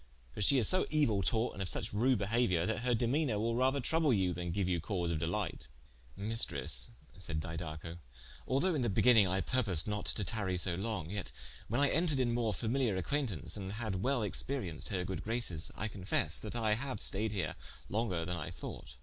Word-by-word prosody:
For - - -5
she 135 +7 +5
is 120 - +4
so 185 0 +4
euill 120 -11 +2
taught, 115 +7 +1
and - - -6
of 90 - -2
suche - - -4
rude 125 +5 +3
behauiour, 100 -4 +2
that 110 +3 0
her 125 0 +2
demeanour 120 +1 +1
will 115 +2 0
rather 130 +3 +2
trouble 160 +2 +2
you, 95 -5 +2
than 90 0 -3
geue 100 +2 0
you 90 -3 +1
cause 90 -2 -1
of 80 - -1
delight." 85 +3 -2 0.5
"Maistresse," 115 +4 -1 0.3
said 80 -5 -3
Didaco, 80 +1 -5 0.5
"although 155 +8 +2
in 150 - 0
the 120 - +1
beginning 110 0 +6
I 95 +1 +1
purposed 100 -10 0
not 105 -1 -2
to 105 - 0
tary 100 -3 -1
so 90 0 +1
long, 95 -3 -3
yet 100 -1 -4 0.4
when 120 +6 0
I 145 - +4
entered 160 -5 +2
in 120 -2 +2
more 115 -2 +1
familiar 115 0 0
acquaintaunce 110 - -2
and 100 -2 -4
had 105 -4 -2
well 130 0 +1
experienced 100 - -2
her 90 -2 -1
good 95 -3 -4
graces, 110 -8 0
I 110 - -1
confesse 95 -3 -1
that - - 0
I 110 -2 +2
haue 130 +3 -2
staied 105 +1 0
here 90 -9 -2 0.3
longer 95 -6 -1
then 90 +1 -2
I - - -4
thought. 65 - -8
105 Hz, 200 wpm, -34 LUFS, 90-120 Hz, 0.5 s, beginning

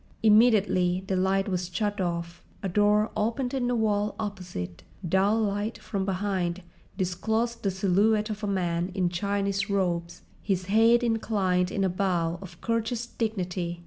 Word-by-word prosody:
Immediately 210 -5 +4
the 190 - -1
light 190 +1 +1
was 180 -2 -2
shut 205 0 -1
off, 170 -1 -3 0.2
a - - 0
door 210 +3 +3
opened 235 +4 -1
in 255 -2 0
the 245 - +1
wall 210 -2 +1
opposite, 180 - -5 0.3
dull 195 +5 +3
light 205 +1 -1
from 195 -3 -3
behind 190 -2 -1 0.3
disclosed 220 +5 -1
the 200 - 0
silhouette 205 +3 +2
of 210 0 -6
a - - 0
man 175 -2 0
in 180 -3 +1
Chinese 200 +2 -1
robes, 175 -3 -1 0.2
his 190 -3 -1
head 225 +4 +4
inclined 200 -6 +1
in 195 - -1
a - - +3
bow 175 -2 0
of 175 -3 -11
courteous 230 +1 -1
dignity. 180 -7 -3
195 Hz, 150 wpm, -27 LUFS, 180-215 Hz, 0.3 s, Immediately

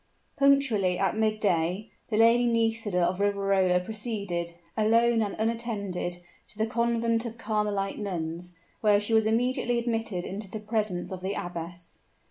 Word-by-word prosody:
Punctually 265 -10 +3
at 195 0 +1
midday, 215 -3 0 0.2
the 215 - 0
Lady 230 +2 +5
Nisida 225 -5 +1
of 180 +2 0
Riverola 195 -2 +2
proceeded, 200 -5 -3 0.2
alone 230 +1 +3
and 205 -2 -2
unattended, 215 -6 -2 0.3
to - - -15
the 220 - +1
Convent 230 0 +1
of 230 0 -8
Carmelite 210 -3 -1
Nuns, 175 -3 -4 0.2
where 210 -2 +4
she 210 +2 -2
was 220 -1 +4
immediately 245 +1 +1
admitted 225 -6 -2
into 200 +1 -5
the 220 - -5
presence 210 -5 -2
of 185 -1 -5
the 190 +2 -2
abbess. 175 0 -6
210 Hz, 140 wpm, -27 LUFS, 185-230 Hz, 0.3 s, Lady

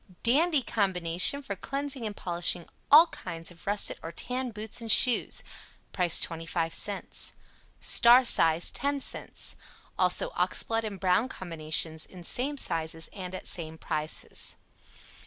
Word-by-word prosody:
"DANDY" 295 +4 +2
Combination 190 +4 +3
for 200 - -6
cleansing 275 +2 -5
and 205 - -8
polishing 175 -1 -1 0.2
ALL 310 +4 +8
kinds 165 +1 -7
of 175 +1 -18
russet 205 +1 +1
or 165 - -8
tan 250 +8 -4
boots 220 +1 -6
and 225 -1 -1
shoes. 245 +2 +5 0.5
Price 180 -3 +1
25c. 165 +4 -3 0.5
"STAR" 245 +2 +5
size, 165 -6 +4
10c. 280 +1 -3 0.4
Also - - +3
Oxblood 225 - -1
and 200 -3 -7
Brown 185 +7 +1
Combinations 160 -3 -1
in 180 -2 -13
same 275 - -2
sizes 165 -6 -1
and 185 -2 -8
at - - -9
same 160 -2 -3
prices. 155 0 -3
190 Hz, 125 wpm, -27 LUFS, 165-245 Hz, 0.5 s, ALL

